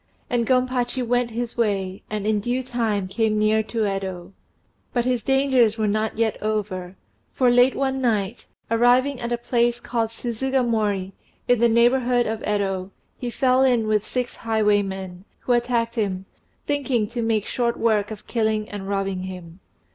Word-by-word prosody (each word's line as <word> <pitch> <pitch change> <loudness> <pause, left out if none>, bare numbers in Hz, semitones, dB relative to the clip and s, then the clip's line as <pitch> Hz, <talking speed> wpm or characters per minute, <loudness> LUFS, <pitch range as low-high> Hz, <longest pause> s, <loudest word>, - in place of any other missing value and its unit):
And 235 -2 +1
Gompachi 255 -1 +1
went 245 0 +1
his 235 +1 -4
way, 195 -5 -1
and 210 -1 -3
in 215 -1 +2
due 245 +5 -1
time 225 -6 -1
came 215 +2 0
near 215 +1 +3
to 220 +1 -2
Yedo. 190 -2 -3 0.6
But 240 -1 +1
his 250 -2 +1
dangers 265 -4 +3
were 215 -1 +1
not 215 +2 -1
yet 225 -1 0
over; 195 -4 -3 0.3
for 250 -2 +2
late 245 +2 +5
one 265 -1 -1
night, 220 -2 -1 0.2
arriving 245 +4 +3
at 240 0 -4
a 240 - +1
place 240 0 +1
called 230 -2 -1
Suzugamori, 230 -5 -1 0.4
in 245 -2 +4
the 235 0 +4
neighbourhood 240 +1 +3
of 220 0 -3
Yedo, 195 -2 -1 0.3
he 245 - -3
fell 255 +2 +2
in 245 -4 +3
with 215 -1 +1
six 250 +2 -3
highwaymen, 200 -4 0 0.2
who - - -2
attacked 240 -1 +1
him, 195 -5 -2 0.4
thinking 270 -7 0
to 240 0 -3
make 225 -2 0
short 235 -1 -1
work 215 -3 +1
of 215 -2 -8
killing 220 -2 0
and 200 -1 -6
robbing 195 -2 -1
him. 180 -2 -9
225 Hz, 160 wpm, -23 LUFS, 205-245 Hz, 0.6 s, late